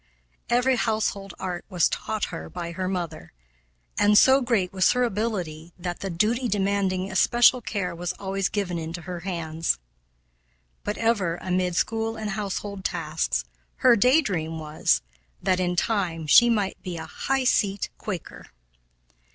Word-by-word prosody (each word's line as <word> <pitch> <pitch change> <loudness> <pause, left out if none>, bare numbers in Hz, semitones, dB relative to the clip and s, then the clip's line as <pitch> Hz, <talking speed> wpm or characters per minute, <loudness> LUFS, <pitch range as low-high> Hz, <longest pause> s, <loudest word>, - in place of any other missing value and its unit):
Every 250 +2 +3
household 215 -4 -1
art 180 -2 -4
was 180 -4 +3
taught 215 -2 -2
her 165 - -6
by 170 -1 -5
her 185 +2 -3
mother, 175 -4 -4 0.7
and 205 0 +5
so 265 +4 +6
great 220 -8 0
was 185 -1 +4
her 250 0 +2
ability 185 -8 -3
that 175 -1 -4
the 195 - -4
duty 220 +8 +1
demanding 195 -2 0
especial 240 +6 +4
care 195 -6 -3
was 175 +1 -3
always 195 0 -2
given 185 -5 -2
into 165 +1 -6
her 175 0 -5
hands. 165 -3 -1 1.1
But 210 - -3
ever, 205 -7 +1
amid 180 -1 -1
school 225 +3 0
and 215 -1 -3
household 200 -1 -4
tasks, 160 - -1 0.4
her 245 -2 +8
day 250 +8 +5
dream 165 - -2
was 155 0 +1 0.4
that, 185 - +1
in 180 -1 0
time, 175 -5 0
she 240 +11 +7
might 205 -4 0
be 180 -3 -5
a 160 - -6
"high 270 +11 -1
seat" 205 -5 +1
Quaker. 185 -6 -6
190 Hz, 150 wpm, -25 LUFS, 175-215 Hz, 1.1 s, her